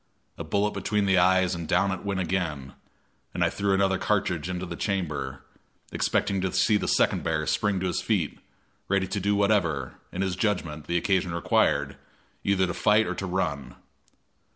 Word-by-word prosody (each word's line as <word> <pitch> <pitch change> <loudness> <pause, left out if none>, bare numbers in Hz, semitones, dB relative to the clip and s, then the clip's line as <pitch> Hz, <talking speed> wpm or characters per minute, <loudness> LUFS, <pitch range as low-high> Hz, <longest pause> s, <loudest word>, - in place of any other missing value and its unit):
A - - -6
bullet 100 +6 0
between 100 +1 0
the 95 -2 +4
eyes 95 0 +3
and 85 -2 -5
down 95 +2 +2
it 95 - -4
went 100 -2 -2
again, 80 -7 -2 0.6
and - - +1
I - - +2
threw 100 0 -1
another 95 -1 +2
cartridge 90 -7 0
into 90 0 -3
the - - -6
chamber, 85 -8 -3 0.5
expecting 100 -1 0
to 95 0 -1
see 110 - +3
the - - -3
second - - +2
bear 80 -1 -1
spring 105 +2 +1
to - - -1
his 90 - -1
feet, 95 -9 -1 0.5
ready 100 -1 +1
to 100 - -3
do 100 +2 +1
whatever, 85 - +1
in 95 - -2
his 95 -2 -1
judgment, 90 -7 -2
the 85 - +1
occasion 90 -1 0
required, 85 - +1 0.5
either 100 -1 +2
to 85 - -3
fight 105 +1 +3
or - - -2
to 95 - -4
run. 70 -9 -2
95 Hz, 180 wpm, -26 LUFS, 85-100 Hz, 0.6 s, the